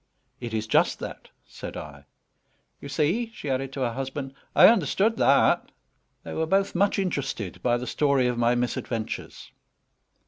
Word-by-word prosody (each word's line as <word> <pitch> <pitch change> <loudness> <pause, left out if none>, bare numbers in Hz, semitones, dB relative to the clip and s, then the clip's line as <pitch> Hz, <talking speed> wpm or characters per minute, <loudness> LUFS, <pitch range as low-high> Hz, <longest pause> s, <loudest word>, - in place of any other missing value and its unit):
"It 120 -2 -6
is 110 0 -1
just - - +2
that," - - -8 0.2
said - - -8
I. 70 -2 -9 0.7
"You 140 - -9
see," 170 - 0
she 145 - -4
added 135 +1 -2
to 140 - -4
her 120 -2 0
husband, 135 +2 -5 0.2
"I - - +9
understood 215 - +3
that." - - +3 0.5
They - - -7
were 160 0 -1
both 195 +3 +1
much 200 +3 +2
interested 135 - -3
by 120 -1 +2
the 125 - -5
story 140 -1 +2
of 125 0 +1
my 120 +1 +2
misadventures. 120 -2 -4
135 Hz, 160 wpm, -26 LUFS, 120-160 Hz, 0.7 s, I